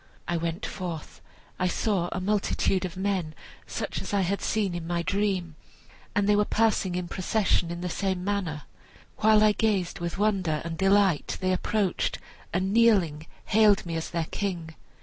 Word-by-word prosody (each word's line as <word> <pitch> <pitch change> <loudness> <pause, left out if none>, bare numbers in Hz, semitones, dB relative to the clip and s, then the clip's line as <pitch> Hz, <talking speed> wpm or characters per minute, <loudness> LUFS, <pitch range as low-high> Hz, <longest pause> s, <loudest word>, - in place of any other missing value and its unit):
I 175 - 0
went 165 +2 -2
forth; 175 -5 -6 0.4
I 185 - +2
saw 180 -2 0
a - - -2
multitude 195 -1 +1
of 185 0 -6
men, 190 -5 -1 0.3
such - - -4
as - - -3
I 200 - +3
had 195 +2 -1
seen 205 -4 0
in 170 -1 -5
my 170 0 -1
dream, 195 -3 0 0.6
and 205 -1 +2
they 210 - +5
were 210 - +4
passing 210 -4 +1
in 180 -1 -2
procession 185 -2 +1
in 170 0 -5
the 180 - -2
same 190 0 -2
manner. 185 -7 -2 0.5
While 215 0 +5
I 215 - +6
gazed 200 -4 0
with 170 +1 -3
wonder 190 -7 +1
and 165 -1 -3
delight 195 -3 +2
they 185 0 +1
approached 195 0 0 0.3
and 190 +3 0
kneeling 190 -10 +3 0.2
hailed 210 -2 +4
me 165 -1 -4
as 160 - -3
their 170 -1 -1
king. 175 -5 -3
185 Hz, 170 wpm, -27 LUFS, 170-205 Hz, 0.6 s, I